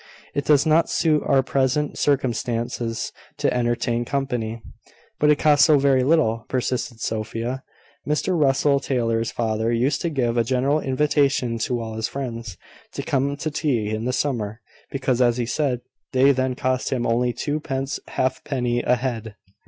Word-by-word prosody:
It 140 - -2
does 145 -2 +4
not 160 +1 +3
suit 155 -2 +2
our 135 -1 +4
present 135 +3 0
circumstances 120 -4 -1 0.3
to - - +1
entertain 120 0 0
company." 120 -4 -2 0.6
"But 150 - +4
it 150 - +5
costs 145 -2 +5
so 150 - +5
very 135 -1 +3
little!" 130 -7 +2
persisted 125 -2 -2
Sophia. 115 +4 -3 0.5
"Mr 150 +5 0
Russell 140 -2 +3
Taylor's 115 -4 0
father 110 0 -1
used 125 +5 +1
to 170 - 0
give 120 -6 0
a 115 - +4
general 130 +5 +1
invitation 135 -4 +1
to 120 +2 -1
all 110 -1 -5
his 110 0 -2
friends 115 -8 -5 0.4
to - - -4
come 140 +1 0
to 155 +1 -3
tea 125 -9 0
in 110 +1 -2
the 125 - 0
summer, 115 -5 -2 0.3
because, 130 -2 0
as 120 -1 +3
he 120 - 0
said, 130 -1 -1 0.3
they 130 +2 +5
then 130 -1 0
cost 130 0 -1
him 125 -3 -1
only 120 +2 +1
twopence 135 0 -3
halfpenny 125 -2 -1
a 125 - +3
head." 115 -4 -4
130 Hz, 160 wpm, -23 LUFS, 115-140 Hz, 0.6 s, it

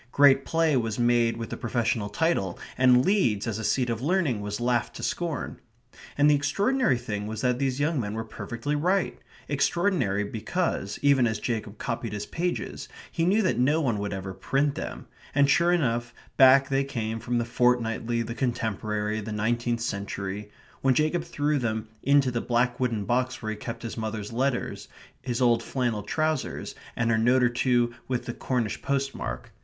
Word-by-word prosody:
Great 140 -1 +5
play 165 -2 +2
was 115 -4 0
made 120 -1 +2
with 115 -1 -6
the - - -2
professional 115 -3 -1
title, 100 - 0 0.2
and 125 0 +5
Leeds 120 - +2
as 110 -2 -2
a - - -4
seat 120 +4 +1
of 115 -1 -2
learning 150 - +1
was 105 +1 -4
laughed 120 -1 0
to - - -7
scorn. 170 -4 -3 0.6
And 145 +1 +5
the 150 - +6
extraordinary 150 - +2
thing 105 -4 -4
was 110 0 -4
that 125 -1 +1
these 135 -1 0
young 150 0 +1
men 105 -2 -3
were 115 - -2
perfectly 120 +5 -4
right 180 +5 0 0.3
extraordinary, 145 - +1
because, 110 - -2
even 140 -4 +5
as 110 -1 -1
Jacob 110 -3 -3
copied 115 -1 -3
his 105 0 -4
pages, 175 +7 -3 0.2
he 165 - 0
knew 205 +5 +3
that 185 - +1
no 145 +6 +3
one 120 -9 0
would 100 0 -3
ever 95 -1 -5
print 140 +8 0
them; - - -6 0.3
and 140 -1 +5
sure 170 +5 +4
enough 120 -8 0 0.2
back 135 +1 +7
they 135 0 +2
came 115 -5 -3
from 120 +2 -1
the 120 - 0
Fortnightly, 120 -1 +1
the 115 - -5
Contemporary, 110 -3 -2
the 110 +1 -6
Nineteenth 120 +2 0
Century 100 -1 -4 0.3
when 130 -1 +3
Jacob 155 +4 +1
threw 150 -3 0
them 110 -2 -2
into 140 -1 +3
the 120 -1 -1
black 120 0 +1
wooden 115 -5 0
box 125 +3 0
where 110 -1 -4
he - - -3
kept 115 +3 -7
his 115 - -5
mother's 110 -1 -4
letters, 130 +1 -1 0.3
his 125 -1 -1
old 120 -1 +4
flannel 120 -4 -1
trousers, 155 +9 -2 0.2
and 120 0 +1
a 110 - +3
note 125 +3 +4
or 120 - +5
two 120 -1 +1
with 125 -2 -2
the 120 - -4
Cornish 120 -5 -2
postmark. 135 - -3
120 Hz, 180 wpm, -27 LUFS, 110-140 Hz, 0.6 s, back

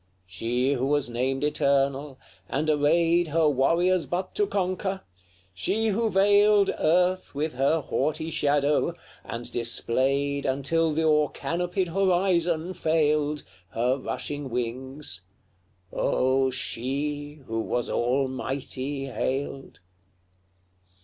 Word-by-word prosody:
She 120 +8 -1
who 130 0 -1
was 145 -3 +1
named 130 +3 -1
eternal, 140 -1 +1 0.3
and 155 +3 0
arrayed 165 +3 +3
Her 160 +1 +2
warriors 170 +6 +2
but 180 +2 -3
to 415 -1 +1
conquer 190 - -2 0.5
she 215 - 0
who 220 +2 +1
veiled 205 +1 +4
Earth 180 +1 +2
with 150 +1 -1
her 140 +5 +2
haughty 155 +3 -2
shadow, 145 +3 +1 0.3
and 120 +1 -6
displayed 135 +4 0
Until 150 +5 +1
the 160 +2 0
o'er 150 -2 +3
canopied 180 +2 -2
horizon 180 -2 +1
failed, 150 -3 +1 0.3
Her 125 +3 +2
rushing 135 +2 -5
wings 125 -2 -4 0.7
Oh! 130 +1 +2
she 145 +4 -4
who 115 -1 -3
was 120 +1 -1
almighty 135 +2 -2
hailed! 135 -1 -4
145 Hz, 105 wpm, -26 LUFS, 130-170 Hz, 0.7 s, veiled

